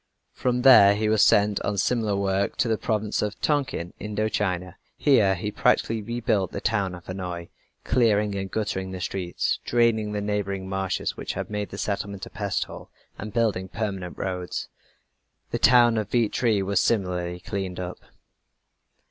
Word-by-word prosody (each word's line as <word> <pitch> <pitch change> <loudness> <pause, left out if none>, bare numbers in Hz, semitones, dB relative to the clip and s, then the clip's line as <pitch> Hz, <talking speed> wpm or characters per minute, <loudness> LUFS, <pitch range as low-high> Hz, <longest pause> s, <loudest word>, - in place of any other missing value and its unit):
From 125 -1 -1
there 100 -7 +8
he 110 +1 0
was 110 -1 +3
sent 105 0 +4
on 105 0 -2
similar 110 -1 +1
work 100 0 0
to - - +1
the 110 -1 0
province 110 -1 -1
of 105 +1 -3
Tonkin, 135 - -1
Indo 105 +1 -2
China. 90 -4 -2 0.2
Here 110 -9 +4
he 105 +4 -4
practically 110 +1 +1
rebuilt 105 -4 -1
the - - -4
town 100 -5 0
of 85 - -13
Hanoi, 90 -2 -5 0.3
clearing 105 -4 +2
and 95 -1 -3
guttering 95 -2 -2
the 95 0 -6
streets, 90 -1 -2
draining 115 -3 +2
the 105 - -2
neighboring 100 -2 -2
marshes 95 -1 -2
which - - -5
had - - -5
made 105 -1 -3
the - - -8
settlement 100 -1 -3
a - - -12
pest 100 -3 -1
hole, - - -11 0.3
and 110 +1 -6
building 110 -5 0
permanent 95 -3 -4
roads. 90 -2 -4 0.8
The - - -1
town 120 -3 +5
of 105 - -4
Vietri 115 -3 +1
was 100 0 +1
similarly 90 -5 0
cleaned 95 0 -4
up. 90 0 -5
100 Hz, 165 wpm, -25 LUFS, 95-110 Hz, 0.8 s, there